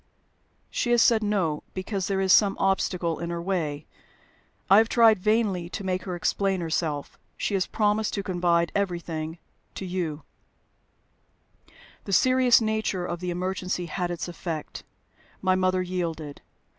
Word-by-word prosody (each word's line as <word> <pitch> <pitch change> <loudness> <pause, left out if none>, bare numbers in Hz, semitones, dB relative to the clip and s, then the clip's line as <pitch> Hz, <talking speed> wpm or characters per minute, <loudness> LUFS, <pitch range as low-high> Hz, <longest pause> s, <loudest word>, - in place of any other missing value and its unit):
"She 240 - -1
has 240 -1 +4
said 230 -3 +4
No, 190 -8 0
because 190 0 -3
there 195 -1 0
is 190 -1 +4
some 200 -2 +4
obstacle 180 -3 0
in 170 - -4
her 170 0 -3
way. 165 -5 -2 0.8
I 195 +2 +7
have 225 +1 +2
tried 225 -4 +5
vainly 205 -4 +1
to 195 - -6
make 185 -1 -2
her 185 -2 -3
explain 195 +2 0
herself. 160 -3 -3 0.2
She - - -2
has 190 -2 +1
promised 210 0 0
to 200 - -2
confide 175 -2 +1
everything 170 -4 -3 0.4
to 190 - -5
you." 170 -5 -3 1.8
The 195 - -3
serious 255 +3 +5
nature 220 -5 -1
of 175 -1 -4
the 180 0 -4
emergency 180 0 -2
had 175 +1 -3
its 175 -2 -4
effect. 165 -3 -6 0.6
My 185 -1 +2
mother 185 0 +1
yielded. 165 -5 -4
185 Hz, 145 wpm, -26 LUFS, 170-200 Hz, 1.8 s, I